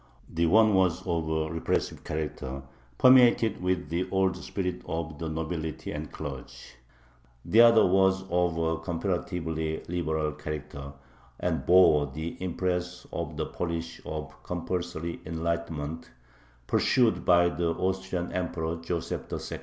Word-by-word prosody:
The 85 0 0
one 110 +4 +5
was 95 -1 +2
of 85 -3 -1
a 80 0 -1
repressive 80 - -1
character, 70 -3 -4 0.3
permeated 120 -5 +6
with 90 -4 -1
the 85 +3 -1
old 95 -1 +2
spirit 90 +1 -4
of 80 -2 -4
the 80 - -3
nobility 80 0 -4
and 75 +1 -5
clergy. 70 -4 -7 0.9
The 110 +7 +6
other 115 -1 +7
was 95 +1 +3
of 90 -1 +1
a 80 0 0
comparatively 80 -2 -2
liberal 80 -3 -1
character, 75 -2 -6 0.5
and - - -1
bore 85 -5 +6
the 80 +5 -5
impress 90 0 -2
of 80 -3 -4
the 80 - -1
policy 85 -1 -4
of 80 0 -5
"compulsory 85 -1 -4
enlightenment" 80 -1 -3 0.6
pursued 120 - +2
by 85 -1 +5
the 85 -1 -1
Austrian 95 -1 -2
Emperor 85 -2 -2
Joseph 85 0 -4
II. - - -4
85 Hz, 130 wpm, -28 LUFS, 80-90 Hz, 0.9 s, other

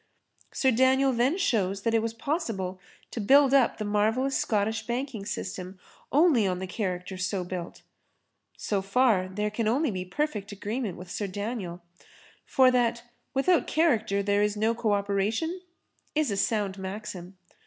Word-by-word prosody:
Sir 265 - +2
Daniel 260 +2 +3
then 250 +8 +2
shows 200 - 0
that 230 - +1
it 225 - +3
was 225 0 -3
possible 225 - -3 0.3
to 230 - -4
build 270 +5 +5
up 270 -4 +4
the 215 - -3
marvellous 220 +6 +1
Scottish 220 +1 0
banking 240 -4 -3
system 185 0 -5 0.3
only 285 - +4
on 180 -1 -1
the 190 - -4
character 185 -1 -4
so 185 0 -1
built. 180 -1 -6 0.7
So 200 -2 -1
far 200 -1 +2
there 210 +3 -2
can 215 +1 -1
only 265 +4 +2
be 185 -2 -3
perfect 210 -1 -3
agreement 205 0 -4
with 180 0 -10
Sir 205 - -2
Daniel, 195 -3 -5 0.6
for 260 -1 +5
that 235 -1 +1 0.3
'without 335 +6 +3
character 220 -11 +2
there 200 0 +2
is 210 0 +1
no 220 +2 +2
co 230 -2 -1
operation' 205 - -1 0.5
is 305 -6 +1
a - - 0
sound 200 -1 0
maxim. 190 -1 -7
215 Hz, 155 wpm, -27 LUFS, 195-255 Hz, 0.7 s, build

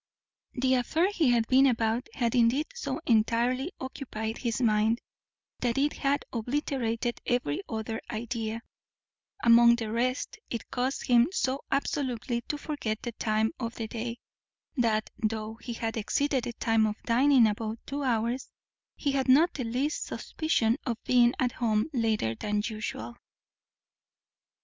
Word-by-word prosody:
The 260 +1 +1
affair 315 - +2
he 325 -9 +2
had 235 -2 +3
been 265 +1 +6
about 230 0 0
had 235 -3 0
indeed 245 +5 +3
so 480 - -3
entirely 240 +6 +2
occupied 235 -4 -5
his 230 -4 -1
mind, 220 -1 +3 0.6
that 240 -1 0
it 290 +2 +2
had 280 +1 0
obliterated 240 -1 -2
every 245 -13 0
other 225 0 -3
idea; 230 0 -3 0.8
among 235 0 +7
the 225 -2 -4
rest, 250 - -1
it 235 - -5
caused 255 +2 -1
him 240 -1 +5
so 270 -7 -1
absolutely 255 -4 -1
to 295 - -2
forget 285 -8 -4
the 240 - -3
time 220 -1 0
of 230 -2 -4
the 225 - -4
day, 230 +1 -4 0.6
that, 225 -4 +1
though 220 0 -2
he 240 - -5
had 225 -1 -3
exceeded 260 +4 0
the 240 - -4
time 225 -1 +2
of 210 - -2
dining 255 +1 +5
above 215 +1 -1
two 285 +1 -4
hours, 240 0 0 0.5
he 285 - -1
had 270 -1 0
not 310 +7 +6
the 260 - -3
least 260 +7 -1
suspicion 245 -7 0
of 235 -4 -2
being 245 -1 +5
at 250 -2 +1
home 220 -3 +1
later 220 - +1
than 210 - -2
usual. 210 - -5
235 Hz, 145 wpm, -28 LUFS, 225-260 Hz, 0.8 s, among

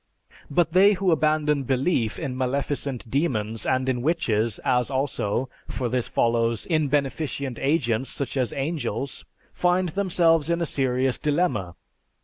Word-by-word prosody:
"But 165 +2 +1
they 195 +3 +6
who 190 -1 +1
abandon 155 -2 +2
belief 130 -3 0
in 140 -6 -4
maleficent 135 0 -2
demons 115 -5 -1
and 130 0 +1
in 125 -2 0
witches 115 - 0
as 125 0 +2
also, 130 -3 -1 0.2
for 125 -2 -3
this 125 0 -1
follows, 115 -1 +1
in 155 -3 +1
beneficent 140 -2 -2
agents, 135 -4 +1
such 140 -2 -2
as 130 -3 0
angels, 135 -4 -3 0.3
find 180 0 +1
themselves 170 -4 +2
in 170 0 +1
a 170 - 0
serious 130 -3 0
dilemma. 145 - 0
135 Hz, 135 wpm, -24 LUFS, 125-160 Hz, 0.3 s, they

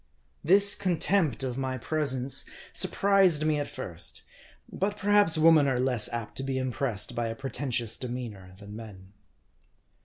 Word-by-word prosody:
This 200 +4 +6
contempt 175 - +1
of 130 0 -4
my 130 -1 -3
presence 135 -1 -1 0.3
surprised 195 -6 +2
me 155 -1 +1
at 145 - -3
first; - - -6 0.5
.but 205 +2 -2
perhaps 205 -5 +3
women 155 -2 +5
are 130 -2 0
less 125 -4 0
apt 115 -2 -6
to 135 - -3
be 135 -1 -3
impressed 130 -4 -2
by 120 -1 -2
a 115 - -5
pretentious 125 -3 -1
demeanor, 115 -7 -7
than 100 +1 -11
men. 100 -4 -12
135 Hz, 145 wpm, -27 LUFS, 120-160 Hz, 0.5 s, This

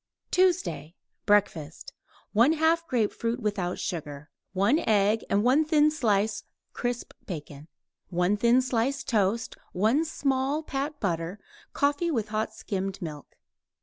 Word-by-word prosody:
TUESDAY 360 - +1 0.3
BREAKFAST 175 -7 +1 0.4
1/2 320 +7 +3
grapefruit 235 -1 0
(without 200 -5 -2
sugar); 150 -3 -5 0.2
1 200 - +3
egg 210 +1 +3
and 200 +1 +2
1 270 +6 +4
thin 305 0 +4
slice 215 -7 +1 0.3
crisp 245 0 -3
bacon; 150 -4 -7 0.4
1 180 +3 +1
thin 235 +4 +4
slice 255 +2 0
toast; 215 0 0 0.2
1 220 - +2
small 275 0 0
pat 285 +1 -3
butter; 175 0 -2 0.3
coffee 290 +4 +1
with 225 -9 -1
hot 215 +1 -1
skimmed 195 -3 -4
milk. 150 -5 -8
220 Hz, 115 wpm, -27 LUFS, 190-275 Hz, 0.4 s, 1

